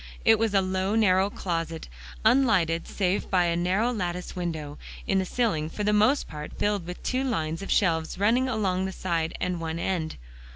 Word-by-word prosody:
It 225 Hz, -1 st, +6 dB
was 220 Hz, -2 st, +1 dB
a 195 Hz, -, +5 dB
low 190 Hz, +2 st, 0 dB
narrow 195 Hz, -3 st, +4 dB
closet, 165 Hz, -4 st, -3 dB, 0.4 s
unlighted 185 Hz, -11 st, +3 dB
save 190 Hz, -1 st, -1 dB
by 180 Hz, -2 st, +3 dB
a 170 Hz, -1 st, +1 dB
narrow 185 Hz, +8 st, +1 dB
latticed 180 Hz, -5 st, -3 dB
window, 160 Hz, -5 st, -4 dB, 0.3 s
in 195 Hz, -, +2 dB
the 190 Hz, -, 0 dB
ceiling, 180 Hz, -9 st, 0 dB
for 210 Hz, -, -4 dB
the 210 Hz, +1 st, +2 dB
most 215 Hz, +7 st, +3 dB
part 150 Hz, 0 st, -8 dB
filled 205 Hz, -4 st, 0 dB
with 180 Hz, -, -7 dB
two 255 Hz, +1 st, 0 dB
lines 165 Hz, -10 st, -2 dB
of 195 Hz, -, -7 dB
shelves 165 Hz, -4 st, +1 dB
running 235 Hz, +6 st, +2 dB
along 190 Hz, -5 st, 0 dB
the 190 Hz, -, -3 dB
side 165 Hz, -4 st, -2 dB
and 180 Hz, -1 st, -1 dB
one 165 Hz, 0 st, -3 dB
end. 170 Hz, -2 st, -2 dB
185 Hz, 190 wpm, -26 LUFS, 165-210 Hz, 0.4 s, It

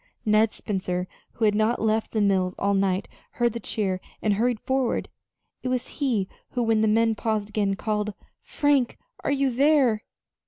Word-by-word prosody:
Ned 215 Hz, 0 st, +4 dB
Spencer, 185 Hz, -2 st, -3 dB, 0.3 s
who 225 Hz, -, 0 dB
had 210 Hz, -, +4 dB
not 215 Hz, +3 st, +2 dB
left 220 Hz, 0 st, 0 dB
the 215 Hz, -, 0 dB
mills 190 Hz, -2 st, +2 dB
all 200 Hz, 0 st, +1 dB
night, 195 Hz, 0 st, +1 dB, 0.3 s
heard 240 Hz, -2 st, +1 dB
the 235 Hz, -, -4 dB
cheer 190 Hz, -5 st, -2 dB, 0.2 s
and 210 Hz, -, +1 dB
hurried 235 Hz, +2 st, +1 dB
forward. 260 Hz, 0 st, 0 dB, 0.5 s
It -, -, -4 dB
was 255 Hz, -1 st, -1 dB
he 230 Hz, -9 st, +1 dB, 0.3 s
who, 245 Hz, -, 0 dB
when 225 Hz, -1 st, +2 dB
the 220 Hz, -, +3 dB
men 225 Hz, +1 st, +3 dB
paused 215 Hz, -1 st, -1 dB
again, 205 Hz, -2 st, 0 dB
called: 210 Hz, 0 st, -2 dB, 0.3 s
"Frank, 285 Hz, -4 st, +1 dB, 0.3 s
are -, -, 0 dB
you 275 Hz, -1 st, +2 dB
there?" 265 Hz, -4 st, +3 dB
220 Hz, 170 wpm, -25 LUFS, 205-240 Hz, 0.5 s, Ned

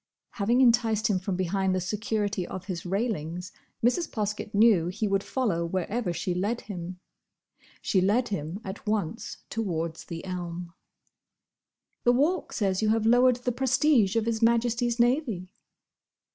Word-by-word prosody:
Having 235 Hz, +5 st, +2 dB
enticed 230 Hz, -3 st, +3 dB
him 190 Hz, -, +1 dB
from 190 Hz, 0 st, -3 dB
behind 185 Hz, +1 st, 0 dB
the -, -, +1 dB
security 205 Hz, 0 st, -2 dB
of 185 Hz, -1 st, -7 dB
his 180 Hz, -3 st, -5 dB
railings, 180 Hz, -4 st, -2 dB, 0.3 s
Mrs. 315 Hz, +7 st, +2 dB
Poskett 210 Hz, -1 st, -3 dB
knew 205 Hz, -5 st, +4 dB
he 210 Hz, +4 st, -2 dB
would 195 Hz, -1 st, +1 dB
follow 205 Hz, -9 st, -1 dB
wherever 185 Hz, +4 st, -2 dB
she 170 Hz, +2 st, -2 dB
led 205 Hz, +7 st, -1 dB
him. 180 Hz, -2 st, -7 dB, 0.8 s
She 190 Hz, -, +2 dB
led 215 Hz, +7 st, +2 dB
him 180 Hz, -1 st, -4 dB
at 190 Hz, +3 st, -8 dB
once 215 Hz, 0 st, -2 dB
towards 170 Hz, -7 st, -3 dB
the 165 Hz, 0 st, -7 dB
elm. 175 Hz, -2 st, -5 dB, 1.3 s
"The 245 Hz, -, +5 dB
Walk 310 Hz, +9 st, +1 dB
says 195 Hz, -2 st, 0 dB
you 215 Hz, -, +2 dB
have 220 Hz, 0 st, +2 dB
lowered 245 Hz, +2 st, +5 dB
the 250 Hz, -, +2 dB
prestige 260 Hz, -4 st, +3 dB
of 225 Hz, -1 st, +1 dB
His 230 Hz, -1 st, -1 dB
Majesty's 235 Hz, +1 st, +2 dB
Navy." 235 Hz, -, +1 dB
205 Hz, 145 wpm, -27 LUFS, 180-235 Hz, 1.3 s, The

